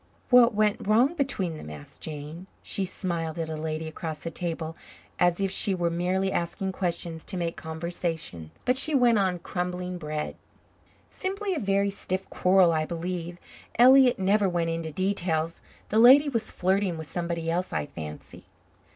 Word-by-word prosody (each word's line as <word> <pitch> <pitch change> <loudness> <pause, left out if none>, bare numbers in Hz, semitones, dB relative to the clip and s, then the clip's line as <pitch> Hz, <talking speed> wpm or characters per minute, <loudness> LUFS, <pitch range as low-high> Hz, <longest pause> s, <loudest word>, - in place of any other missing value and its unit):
"What 245 -2 +7
went 210 -1 +1
wrong 240 +8 +4
between 225 - -1
them?" 75 - -9
asked 75 -1 -11
Jane. 155 +4 -6 0.2
She 195 - -1
smiled 170 -3 -3
at 160 -1 -3
a - - -3
lady 155 +1 -3
across 160 0 -5
the 165 +2 -6
table, 165 -1 -3 0.4
as 175 0 +3
if 195 -1 0
she 195 0 +3
were 170 -2 0
merely 185 +3 0
asking 190 +3 -2
questions 170 -3 -3
to 185 - -3
make 170 -1 -2
conversation, 160 - -4 0.2
but 250 +1 +2
she 300 +2 +1
went 240 -4 +4
on 185 -2 +1
crumbling 180 +1 -4
bread. 150 -1 -4 0.7
"Simply 390 +1 -2
a 325 - -2
very 200 -2 +1
stiff 190 -1 -4
quarrel, 185 -1 +4
I 155 -1 +1
believe. 175 +1 -4 0.4
Elliott 255 +1 +7
never 195 +1 +2
went 170 -2 0
into 165 -1 -3
details. 170 -2 -1 0.3
The 215 - +2
lady 270 +5 +8
was 230 -5 -2
flirting 190 -1 0
with 160 - -5
somebody 170 0 -3
else, 180 +2 -1
I 75 - -1
fancy." 75 0 -9
180 Hz, 165 wpm, -27 LUFS, 165-200 Hz, 0.7 s, lady